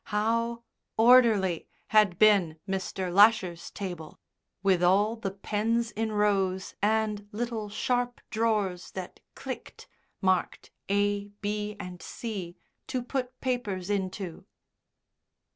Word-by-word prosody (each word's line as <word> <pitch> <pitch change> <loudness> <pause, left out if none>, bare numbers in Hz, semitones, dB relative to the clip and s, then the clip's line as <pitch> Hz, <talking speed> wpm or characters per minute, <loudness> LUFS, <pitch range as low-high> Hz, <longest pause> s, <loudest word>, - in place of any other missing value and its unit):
How 230 +2 0 0.3
orderly 220 -7 +5 0.2
had 210 -5 +4
been 195 -7 +4
Mr. 190 -1 -3
Lasher's 200 -4 +4
table, 175 -6 -7 0.4
with 190 -3 +3
all 200 +5 +4
the 225 -4 -3
pens 220 +4 -1
in 220 +1 -2
rows, 195 -3 +1
and 210 0 +1
little 225 -1 -3
sharp 245 +3 -1
drawers 210 -5 0
that 185 -2 -7 0.2
clicked, - - -8 0.3
marked 185 -2 0 0.2
A, 205 0 +1 0.2
B, 210 0 -2
and 180 -1 -8
C, 195 -7 -6 0.3
to 255 -2 -2
put 255 0 -4
papers 210 -7 -2
into. 190 -3 -3
205 Hz, 110 wpm, -28 LUFS, 190-225 Hz, 0.4 s, orderly